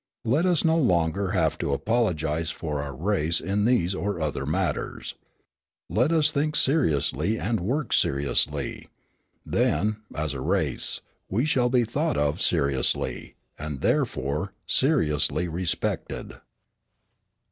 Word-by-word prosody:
Let 150 Hz, +11 st, +2 dB
us 175 Hz, -3 st, +2 dB
no 160 Hz, 0 st, +3 dB
longer 90 Hz, -, +1 dB
have -, -, +1 dB
to 70 Hz, -, -1 dB
apologise 80 Hz, -, 0 dB
for 75 Hz, -4 st, -4 dB
our 70 Hz, -1 st, -6 dB
race 85 Hz, 0 st, +1 dB
in 100 Hz, +2 st, -1 dB
these 105 Hz, -7 st, +2 dB
or 100 Hz, -1 st, -3 dB
other 75 Hz, -2 st, -2 dB
matters. -, -, -2 dB, 0.8 s
Let 125 Hz, -, +2 dB
us 160 Hz, -2 st, +4 dB
think 150 Hz, +1 st, 0 dB
seriously 105 Hz, -, +2 dB
and 115 Hz, 0 st, -1 dB
work 125 Hz, -, -2 dB
seriously: 70 Hz, +1 st, +1 dB, 0.6 s
then, 105 Hz, 0 st, +1 dB, 0.2 s
as 75 Hz, -1 st, -2 dB
a 65 Hz, -, -5 dB
race, -, -, 0 dB, 0.3 s
we 115 Hz, +9 st, +1 dB
shall 125 Hz, -5 st, +2 dB
be 125 Hz, -1 st, +3 dB
thought 145 Hz, +8 st, -1 dB
of 75 Hz, 0 st, 0 dB
seriously, 70 Hz, -1 st, 0 dB, 0.2 s
and, 75 Hz, -2 st, -5 dB
therefore, 75 Hz, +8 st, -1 dB
seriously 90 Hz, -, +2 dB
respected." 85 Hz, +1 st, -3 dB
95 Hz, 125 wpm, -25 LUFS, 75-125 Hz, 0.8 s, us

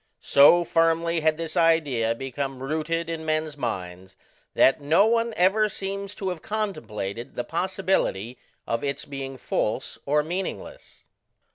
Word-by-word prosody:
So 160 Hz, +5 st, +6 dB
firmly 165 Hz, 0 st, +2 dB
had 155 Hz, 0 st, +2 dB
this 165 Hz, 0 st, -4 dB
idea 150 Hz, -10 st, +2 dB
become 135 Hz, +1 st, -5 dB
rooted 160 Hz, +3 st, -2 dB
in 165 Hz, -1 st, -4 dB
men's 155 Hz, -1 st, -1 dB
minds, 95 Hz, -7 st, -5 dB, 0.4 s
that 135 Hz, -, +4 dB
no 160 Hz, +8 st, +4 dB
one 230 Hz, +1 st, +2 dB
ever 205 Hz, +4 st, +3 dB
seems 200 Hz, 0 st, -5 dB
to 195 Hz, -3 st, -3 dB
have 180 Hz, -3 st, -5 dB
contemplated 120 Hz, -, -4 dB
the 120 Hz, -, -2 dB
possibility 170 Hz, -, -1 dB, 0.3 s
of 115 Hz, 0 st, -2 dB
its 140 Hz, +1 st, -3 dB
being 135 Hz, -1 st, -6 dB
false 115 Hz, 0 st, -2 dB
or 150 Hz, +1 st, +3 dB
meaningless. 190 Hz, -, -6 dB
155 Hz, 135 wpm, -25 LUFS, 135-180 Hz, 0.4 s, So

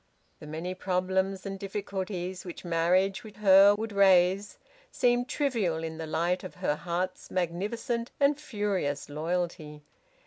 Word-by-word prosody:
The 150 Hz, -, -10 dB
many 165 Hz, +4 st, -4 dB
problems 190 Hz, +1 st, -1 dB
and 195 Hz, 0 st, -5 dB
difficulties 190 Hz, -2 st, -4 dB
which 180 Hz, 0 st, -9 dB
marriage 180 Hz, +3 st, +2 dB
with 215 Hz, -2 st, -12 dB
her 200 Hz, 0 st, +7 dB
would 220 Hz, +1 st, -4 dB
raise 195 Hz, 0 st, +4 dB, 0.3 s
seemed 245 Hz, 0 st, +1 dB
trivial 215 Hz, -, 0 dB
in 160 Hz, 0 st, -5 dB
the 160 Hz, -, -4 dB
light 170 Hz, +3 st, 0 dB
of 185 Hz, -, -8 dB
her 180 Hz, -5 st, 0 dB
heart's 180 Hz, +3 st, -3 dB
magnificent 210 Hz, +7 st, -2 dB
and 285 Hz, +1 st, +4 dB
furious 200 Hz, -, -2 dB
loyalty. 155 Hz, -1 st, -3 dB
185 Hz, 135 wpm, -29 LUFS, 170-205 Hz, 0.3 s, her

